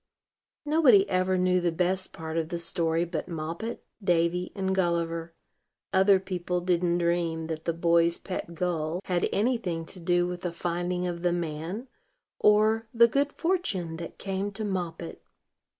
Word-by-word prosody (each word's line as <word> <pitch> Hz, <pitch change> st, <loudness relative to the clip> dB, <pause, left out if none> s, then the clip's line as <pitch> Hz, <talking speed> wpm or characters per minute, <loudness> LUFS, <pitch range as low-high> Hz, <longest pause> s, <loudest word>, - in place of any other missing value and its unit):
Nobody 275 Hz, -10 st, +5 dB
ever 185 Hz, 0 st, +1 dB
knew 180 Hz, 0 st, +2 dB
the 175 Hz, -1 st, +1 dB
best 185 Hz, +3 st, 0 dB
part 160 Hz, 0 st, -6 dB
of 160 Hz, -1 st, -1 dB
the 175 Hz, -, -2 dB
story 170 Hz, -1 st, 0 dB
but 170 Hz, -2 st, -4 dB
Moppet, 170 Hz, +6 st, -5 dB, 0.2 s
Davy, 175 Hz, 0 st, +1 dB
and 190 Hz, -1 st, -1 dB
Gulliver. 170 Hz, -2 st, -1 dB, 0.6 s
Other 190 Hz, 0 st, +5 dB
people 180 Hz, -1 st, -2 dB
didn't 175 Hz, -1 st, +1 dB
dream 170 Hz, -2 st, 0 dB
that 160 Hz, 0 st, -5 dB
the 170 Hz, -, +1 dB
boy's 170 Hz, 0 st, +3 dB
pet 175 Hz, -3 st, -6 dB
gull 170 Hz, 0 st, -1 dB
had 180 Hz, -2 st, 0 dB
any 240 Hz, +5 st, +2 dB
thing 170 Hz, -6 st, -3 dB
to 185 Hz, -, -10 dB
do 175 Hz, +1 st, +2 dB
with 180 Hz, 0 st, -4 dB
the 175 Hz, -, -2 dB
finding 175 Hz, +1 st, -2 dB
of 175 Hz, -1 st, -3 dB
the 175 Hz, 0 st, +2 dB
man, 170 Hz, -, -3 dB, 0.5 s
or 215 Hz, +2 st, +4 dB
the 235 Hz, 0 st, +6 dB
good 280 Hz, +4 st, +1 dB
fortune 200 Hz, -, -1 dB
that 165 Hz, 0 st, -8 dB
came 195 Hz, +1 st, -3 dB
to 215 Hz, +2 st, -4 dB
Moppet. 175 Hz, -4 st, -4 dB
175 Hz, 160 wpm, -28 LUFS, 170-190 Hz, 0.6 s, the